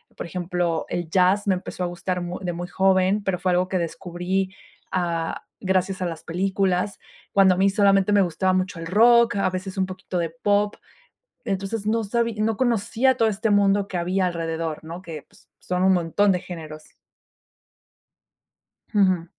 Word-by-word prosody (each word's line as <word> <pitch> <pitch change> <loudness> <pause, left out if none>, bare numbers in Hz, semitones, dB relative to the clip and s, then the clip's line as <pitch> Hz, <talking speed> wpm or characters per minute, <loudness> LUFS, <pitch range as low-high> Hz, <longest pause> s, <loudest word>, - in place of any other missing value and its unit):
por - - -6
ejemplo, 175 -1 -2
el 175 -2 -4
jazz 190 +4 +3
me 195 - +4
empezó 180 0 -5
a - - 0
gustar 180 0 -3
muy 175 +1 -5
de 175 - -1
muy 175 +1 -6
joven, 190 +2 +2
pero 190 -2 0
fue 185 - 0
algo 180 +1 +2
que 185 - -1
descubrí, 180 +2 -3 0.3
ah, 170 -3 -2 0.2
gracias 190 0 0
a 180 - 0
las 165 -2 -5
películas, 190 +2 0 0.4
cuando 190 -2 +5
a - - -6
mí 195 +1 +4
solamente 200 0 +3
me 205 - +5
gustaba 185 +1 +1
mucho 185 -1 -1
el 165 - -6
rock, 235 +4 +5
a 195 - +1
veces 185 +1 -5
un 190 - +2
poquito 185 -1 -6
de 170 -1 0
pop. 205 +5 0 0.7
Entonces, 200 +2 -3
no 225 +1 +1
sabí 230 +2 -1
no 220 0 +1
conocía 240 +1 +1
todo 225 - +4
este 220 +1 -1
mundo 200 0 +3
que 180 - -3
había 185 +2 0
alrededor, 165 -2 -3
¿no?, 170 +3 -8
que, 160 -4 -8
pues, - - -24
son 180 0 -2
un 190 0 +5
montón 185 +3 +2
de 180 - -1
géneros. 155 -4 -9 2.0
Ujú. 185 -5 +3
185 Hz, 175 wpm, -23 LUFS, 175-200 Hz, 2.0 s, cuando